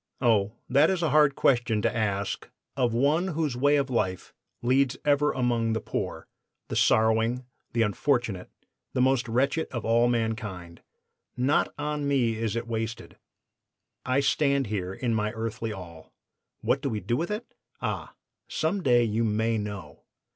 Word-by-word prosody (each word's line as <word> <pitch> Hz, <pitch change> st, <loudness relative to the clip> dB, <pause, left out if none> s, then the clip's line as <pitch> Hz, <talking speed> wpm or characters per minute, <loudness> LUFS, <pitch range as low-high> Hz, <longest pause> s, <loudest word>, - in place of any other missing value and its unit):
Oh, 110 Hz, -5 st, +2 dB
that 140 Hz, +5 st, +4 dB
is 185 Hz, -2 st, 0 dB
a 160 Hz, -, +1 dB
hard 150 Hz, -2 st, +5 dB
question 120 Hz, -4 st, +2 dB
to -, -, +1 dB
ask 100 Hz, -3 st, -2 dB, 0.3 s
of 125 Hz, -3 st, +1 dB
one 145 Hz, +10 st, +2 dB
whose 150 Hz, -6 st, 0 dB
way 145 Hz, +4 st, +3 dB
of 140 Hz, -2 st, 0 dB
life 95 Hz, -6 st, -1 dB, 0.3 s
leads 130 Hz, +1 st, +2 dB
ever 145 Hz, 0 st, +3 dB
among 120 Hz, -3 st, 0 dB
the 110 Hz, -, 0 dB
poor, -, -, -4 dB, 0.4 s
the -, -, -3 dB
sorrowing, 110 Hz, +3 st, +3 dB, 0.3 s
the 115 Hz, -1 st, +3 dB
unfortunate, 110 Hz, -3 st, 0 dB, 0.4 s
the 125 Hz, -, +1 dB
most 130 Hz, 0 st, +2 dB
wretched 135 Hz, +7 st, +1 dB
of 120 Hz, -3 st, -4 dB, 0.3 s
mankind. 110 Hz, -7 st, -3 dB, 0.6 s
Not 130 Hz, +4 st, +2 dB
on 150 Hz, -1 st, -2 dB
me 130 Hz, -5 st, +2 dB
is 110 Hz, -1 st, -2 dB
it 115 Hz, 0 st, -2 dB
wasted. 115 Hz, 0 st, -4 dB, 0.9 s
I 130 Hz, +2 st, +1 dB
stand 140 Hz, -1 st, +2 dB
here 100 Hz, -4 st, -3 dB
in 115 Hz, +4 st, -2 dB
my 105 Hz, -1 st, 0 dB
earthly 110 Hz, 0 st, -4 dB
all. 85 Hz, -5 st, -10 dB, 0.5 s
What -, -, +1 dB
do -, -, -1 dB
we 110 Hz, -, -2 dB
do 115 Hz, +5 st, -1 dB
with 165 Hz, +6 st, -2 dB
it? 210 Hz, +3 st, -5 dB, 0.3 s
Ah! -, -, -4 dB, 0.3 s
some 180 Hz, +5 st, -1 dB
day 120 Hz, -6 st, +4 dB
you 115 Hz, 0 st, 0 dB
may 110 Hz, +1 st, +1 dB
know. 100 Hz, -8 st, -7 dB
120 Hz, 155 wpm, -27 LUFS, 110-140 Hz, 0.9 s, hard